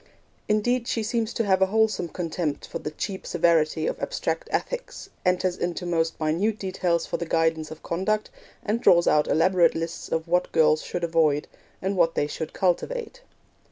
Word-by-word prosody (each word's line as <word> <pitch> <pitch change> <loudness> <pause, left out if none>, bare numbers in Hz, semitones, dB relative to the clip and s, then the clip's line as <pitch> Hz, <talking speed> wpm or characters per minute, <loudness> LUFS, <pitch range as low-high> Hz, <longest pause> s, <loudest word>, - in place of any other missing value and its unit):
Indeed, 235 +3 +1
she 225 - -1
seems 225 +1 -1
to 230 - +1
have 190 -1 +2
a 190 - +5
wholesome 215 -4 +1
contempt 165 -3 -3
for - - -5
the - - -4
cheap 190 +5 -5
severity 170 -3 +2
of - - -2
abstract - - -3
ethics, - - -4
enters 180 0 +1
into 175 +1 -3
the 175 - -3
most 165 -1 0
minute 170 +8 0
details 180 -4 -1
for - - -3
the 170 - -4
guidance 160 -1 +1
of 155 - -10
conduct, 210 +5 -1 0.3
and 220 +3 0
draws 170 -6 +5
out 150 0 +4
elaborate 175 +2 +3
lists 165 0 -4
of 160 +1 -2
what 180 +1 +1
girls 155 -1 +4
should 175 - -5
avoid, 160 -3 +2 0.4
and 195 +1 0
what 165 -2 +2
they - - +1
should 155 +1 -5
cultivate. 475 - -1
175 Hz, 180 wpm, -25 LUFS, 165-210 Hz, 0.4 s, a